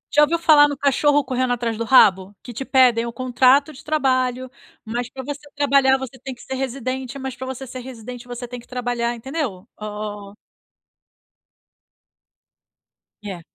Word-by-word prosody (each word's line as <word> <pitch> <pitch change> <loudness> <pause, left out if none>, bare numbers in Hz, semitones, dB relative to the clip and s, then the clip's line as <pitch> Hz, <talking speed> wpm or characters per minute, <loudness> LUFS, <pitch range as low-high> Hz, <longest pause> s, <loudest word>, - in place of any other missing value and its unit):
Já 295 - +7
ouviu 335 +3 +1
falar 300 -3 +6
no 285 - -4
cachorro 285 +1 +3
correndo 255 -1 -1
atrás 230 -2 -2
do 230 - -2
rabo? 205 -5 +5
Que 245 - -9
te 240 - -4
pedem 250 -4 +4
o 235 - -4
contrato 255 +4 +3
de - - -13
trabalho, 255 -4 0 0.4
mas 235 +2 -3
pra 265 - -7
você 285 +2 -6
trabalhar 275 -2 +4
você 265 -1 -8
tem 265 - -5
que 240 - -15
ser 265 - -7
residente, 260 0 -4
mas 265 -1 -5
pra 260 - -7
você 260 0 -6
ser 255 +1 -7
residente 245 -1 -9
você 245 0 -6
tem 245 +1 -7
que 235 - -17
trabalhar, 245 -1 -2
entendeu? 235 - -4
O 210 -1 -7 2.9
É. 190 -4 -6
255 Hz, 165 wpm, -21 LUFS, 235-270 Hz, 2.9 s, Já